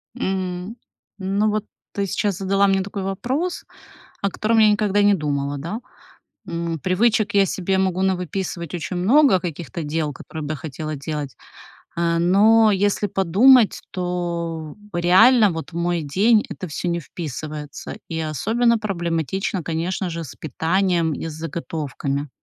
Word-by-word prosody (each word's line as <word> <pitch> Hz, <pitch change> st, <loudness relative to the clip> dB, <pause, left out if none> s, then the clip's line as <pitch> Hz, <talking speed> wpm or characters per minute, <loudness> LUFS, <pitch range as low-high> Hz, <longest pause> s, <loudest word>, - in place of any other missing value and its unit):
М, 185 Hz, +2 st, -3 dB, 0.4 s
ну 200 Hz, +3 st, +1 dB
вот 215 Hz, 0 st, -1 dB, 0.3 s
ты 200 Hz, -1 st, -1 dB
сейчас 200 Hz, 0 st, -1 dB
задала 195 Hz, +1 st, +2 dB
мне 195 Hz, 0 st, +2 dB
такой 200 Hz, 0 st, -5 dB
вопрос, 260 Hz, -, -2 dB, 0.6 s
о 200 Hz, -, +1 dB
котором 225 Hz, +4 st, 0 dB
я 215 Hz, -1 st, +7 dB
никогда 205 Hz, -1 st, +2 dB
не 205 Hz, 0 st, +5 dB
думала, 145 Hz, -4 st, -1 dB
да? 170 Hz, -, -4 dB, 0.7 s
М, 170 Hz, -1 st, -3 dB
привычек 210 Hz, +5 st, +2 dB
я 200 Hz, -1 st, +6 dB
себе 190 Hz, 0 st, -1 dB
могу 190 Hz, -1 st, +1 dB
навыписывать 180 Hz, -2 st, -2 dB
очень 175 Hz, +1 st, -4 dB
много 235 Hz, +2 st, +5 dB
каких-то 165 Hz, -3 st, -5 dB
дел, 150 Hz, 0 st, -1 dB
которые 155 Hz, +3 st, -8 dB
бы 150 Hz, +1 st, -3 dB
я -, -, -4 dB
хотела 155 Hz, +1 st, -5 dB
делать. 145 Hz, -4 st, -5 dB, 0.6 s
А 170 Hz, 0 st, +1 dB
но 215 Hz, +5 st, +5 dB
если 205 Hz, +1 st, +1 dB
подумать, 200 Hz, +6 st, +5 dB
то 170 Hz, -3 st, -3 dB, 0.2 s
реально 200 Hz, +5 st, +6 dB
вот 165 Hz, +1 st, -6 dB
в -, -, -9 dB
мой 170 Hz, -1 st, 0 dB
день 210 Hz, +9 st, +3 dB
это 185 Hz, -, -6 dB
всё 155 Hz, +4 st, -4 dB
не 170 Hz, 0 st, 0 dB
вписывается, 150 Hz, -2 st, -7 dB, 0.2 s
и 160 Hz, -, -2 dB
особенно 230 Hz, -, +2 dB
проблематично, 175 Hz, -, -2 dB
конечно 175 Hz, +3 st, -2 dB
же, 165 Hz, 0 st, -5 dB
с 140 Hz, -, -10 dB
питанием 165 Hz, +2 st, 0 dB
и -, -, -5 dB
с 155 Hz, -, -6 dB
заготовками. 150 Hz, -3 st, -4 dB
180 Hz, 145 wpm, -22 LUFS, 160-200 Hz, 0.7 s, я